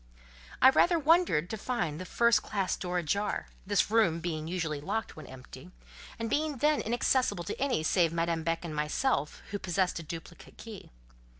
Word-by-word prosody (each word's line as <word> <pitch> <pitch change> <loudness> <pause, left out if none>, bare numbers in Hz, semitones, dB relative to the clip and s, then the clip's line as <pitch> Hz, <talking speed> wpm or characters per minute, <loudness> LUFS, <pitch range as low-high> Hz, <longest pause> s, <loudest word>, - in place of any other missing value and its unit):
I 260 - +9
rather 345 +5 +4
wondered 315 - +3
to 220 - -3
find 175 -11 -2
the - - -6
first 235 +2 +3
classe 195 -4 -1
door 180 -1 -3
ajar; 200 +5 -1 0.2
this 205 +1 +1
room 190 -8 +3
being 160 -2 -4
usually 165 -4 -3
locked 220 +7 -3
when 155 - -10
empty, 130 +4 -12 0.5
and 230 - -3
being 295 +4 -1
then 300 +4 +2
inaccessible 240 -4 +1
to 170 - -6
any 265 - +1
save 165 0 +2
Madame 165 0 -1
Beck 165 +1 -2
and 155 -2 -5
myself, 150 - -1
who 205 - -3
possessed 185 -1 0
a - - -5
duplicate 165 +2 -10
key. 220 -4 -10
180 Hz, 175 wpm, -30 LUFS, 165-235 Hz, 0.5 s, I